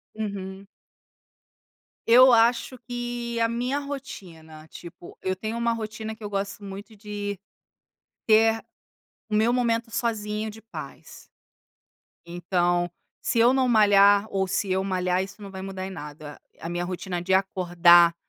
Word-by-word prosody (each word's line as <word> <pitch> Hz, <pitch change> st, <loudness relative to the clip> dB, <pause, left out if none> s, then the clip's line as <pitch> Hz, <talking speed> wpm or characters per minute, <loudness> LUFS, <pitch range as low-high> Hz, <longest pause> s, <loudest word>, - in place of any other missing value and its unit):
Uhum. 200 Hz, -2 st, -6 dB, 1.4 s
Eu 255 Hz, +2 st, +8 dB
acho 235 Hz, +2 st, +3 dB
que 240 Hz, -1 st, -4 dB
a 230 Hz, -, +2 dB
minha 250 Hz, +4 st, -1 dB
rotina 175 Hz, -, -9 dB
tipo, 175 Hz, 0 st, -12 dB
eu 185 Hz, 0 st, -1 dB
tenho 220 Hz, +4 st, -4 dB
uma 235 Hz, 0 st, +1 dB
rotina 220 Hz, 0 st, -5 dB
que 220 Hz, -, -15 dB
eu 205 Hz, -, -4 dB
gosto 200 Hz, 0 st, -4 dB
muito 200 Hz, +3 st, -9 dB
de 205 Hz, -1 st, -5 dB, 0.9 s
ter 225 Hz, 0 st, +4 dB, 0.6 s
o 220 Hz, -, -7 dB
meu 220 Hz, +3 st, +3 dB
momento 235 Hz, -2 st, 0 dB
sozinho 215 Hz, -1 st, -2 dB
de 220 Hz, +1 st, -13 dB
paz. 225 Hz, +2 st, -10 dB, 1.0 s
Então 175 Hz, 0 st, 0 dB, 0.3 s
se 235 Hz, -, 0 dB
eu 240 Hz, +3 st, +5 dB
não 265 Hz, -1 st, +2 dB
malhar 205 Hz, -2 st, +5 dB
ou 190 Hz, -1 st, 0 dB
se 195 Hz, +1 st, -1 dB
eu 190 Hz, +1 st, +1 dB
malhar 185 Hz, -1 st, 0 dB
isso 195 Hz, +2 st, -11 dB
não 200 Hz, -, -8 dB
vai 190 Hz, -1 st, -8 dB
mudar 190 Hz, -1 st, -5 dB
em -, -, -6 dB
nada, 150 Hz, -3 st, -9 dB, 0.2 s
a 165 Hz, -, -6 dB
minha 175 Hz, 0 st, -2 dB
rotina 180 Hz, 0 st, -4 dB
de 190 Hz, +2 st, 0 dB
acordar 175 Hz, -2 st, +5 dB
205 Hz, 145 wpm, -25 LUFS, 185-230 Hz, 1.4 s, Eu